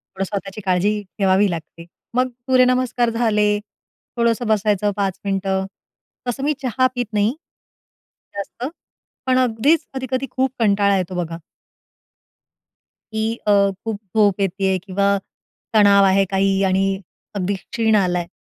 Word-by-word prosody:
थोडं 195 - -1
स्वतःची 200 +1 -5
काळजी 195 +3 +1 0.2
ठेवावी 195 +1 +3
लागते. 165 0 -7 0.3
मग 255 +1 +2 0.2
सूर्यनमस्कार 255 -2 +3
झाले. 210 -3 +2 0.6
थोडंसं 235 0 +1
बसायचं 210 -1 +2
5 195 -2 -1
मिनिटं. 195 -1 0 0.6
तसं 255 +3 -2
मी 300 +1 +2
चहा 255 +1 +2
पीत 245 -1 -1
नाही, 210 +3 +2 1.0
जास्त. 200 +5 -5 0.6
पण 255 0 +3
अगदीच 255 +7 +2
कधी-कधी 260 0 -2
खूप 265 0 0
कंटाळा 200 -2 +3
येतो 185 0 -3
बघा 165 0 -6 1.8
की 220 +1 -1
अ, - - +5 0.3
खूप 225 -2 -2 0.2
झोप 205 -2 +3
येतीय 190 0 +1
किंवा 200 +1 +1 0.6
तणाव 200 -2 +6
आहे 195 0 +4
काही 195 0 +2
आणि 190 0 +2 0.5
अगदी 200 0 -1
क्षीण 220 +3 0
आला 180 -3 +2
आहे. 170 - -5
205 Hz, 125 wpm, -20 LUFS, 195-235 Hz, 1.8 s, तणाव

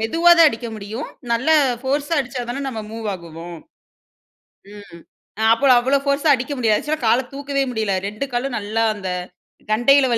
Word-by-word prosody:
மெதுவா 330 +11 +3
தான் 330 -2 +8
அடிக்க 235 -2 -6
முடியும். 215 +7 -6 0.2
நல்ல 235 +7 +1 0.3
போர்ஸா 285 +4 -1
அடிச்சா 255 -1 -5
தானே, 245 +3 -4
நம்ம 225 -4 -5
மூவ் 225 -1 -6
ஆகுவோம். 170 -1 -9 1.2
ம். 200 -5 -13 0.5
அப்போல 265 +3 +4
அவ்ளோ 265 +3 +2
போர்ஸா 280 +2 +1
அடிக்க 255 +2 -3
முடியாது. 220 -4 +3
ஆக்சுவலா 310 +1 -3
கால 240 +4 +3
தூக்கவே 280 0 -2
முடியல. 220 -4 -1
2 215 +7 -4
காலும் 245 +1 -2
நல்லா, 215 +2 -1
அந்த 195 -2 -6 0.6
கண்டையில 265 +5 +4
240 Hz, 155 wpm, -20 LUFS, 215-275 Hz, 1.2 s, தான்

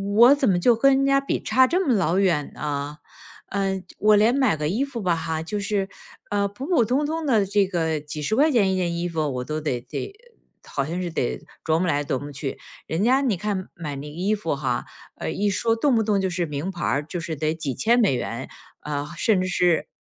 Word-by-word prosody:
“我 240 +6 +8
怎 280 - +1
么 175 -2 +3
就 235 +6 +4
跟 270 +4 +4
人 275 - +2
家 275 0 +4
比 275 - -2
差 260 0 +4
这 360 +5 +1
么 260 - +3
老 180 -1 +2
远 170 -7 +1
啊？” 145 0 -4 0.5
呃， 195 -1 -1 0.2
我 215 0 +5
连 220 +5 +4
买 260 -11 +3
个 150 0 -1
衣 220 - 0
服 255 -5 -6
吧 180 -3 +1
哈， 160 -1 -3
就 190 +6 -4
是， 200 -1 -1 0.4
呃， 200 -1 +1
普 255 +9 -7
普 335 -10 +4
通 260 +7 +1
通 320 +1 -2
的 225 -8 +3
这 200 0 +2
个 160 -4 -1
几 150 +1 -6
十 215 +9 0
块 300 +4 +4
钱 200 -7 +3
一 - - +1
件 175 -2 0
衣 175 +1 -1
服， 165 -2 -2
我 125 - -2
都 155 0 -3
得 140 -5 -1
得 130 - -6 0.5
好 140 - -2
像 170 +4 -3
是 175 - -2
得 65 - -2 0.2
琢 160 0 +2
磨 180 - 0
来 145 -3 +1
琢 135 -2 -2
磨 145 - -7
去， 135 0 -5 0.3
人 160 +3 -1
家 260 +3 +4
你 240 -9 +1
看 195 -1 -3
买 150 -5 -6
那 145 +2 -7
衣 190 +7 0
服 185 -6 -2
哈， 130 -4 -2 0.3
呃， - - -4
一 205 +1 0
说 225 +3 +1
动 265 0 +2
不 225 - +3
动 205 -2 +1
就 190 -1 0
是 175 -1 -1
名 150 +4 -4
牌 180 -2 -6
儿， 145 +1 0
就 175 +2 -5
是 165 -2 -4
得 155 +2 0
几 145 -5 -3
千 235 - +2
美 210 - +3
元。 120 +1 -4 0.3
呃， 145 -1 -3
甚 195 0 +2
至 185 - -1
是 175 -2 +2
185 Hz, 260 characters per minute, -24 LUFS, 155-225 Hz, 0.5 s, 我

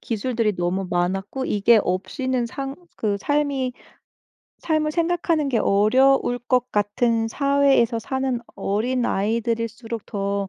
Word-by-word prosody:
기술들이 230 -1 -1
너무 180 +2 -1
많았고 190 +8 -1
이게 215 +2 +4
없이는 240 +7 -1
상 270 +3 -6 0.2
그 205 -2 0
삶이 285 -3 0 0.9
삶을 310 -1 0
생각하는 335 -3 0
게 235 - +2
어려울 245 +5 +3
것 250 0 0
같은 225 +2 +1
사회에서 275 -3 +2
사는 265 +1 -2
어린아이들일수록 230 0 -1
더 200 -1 -2
235 Hz, 265 characters per minute, -23 LUFS, 205-265 Hz, 0.9 s, 이게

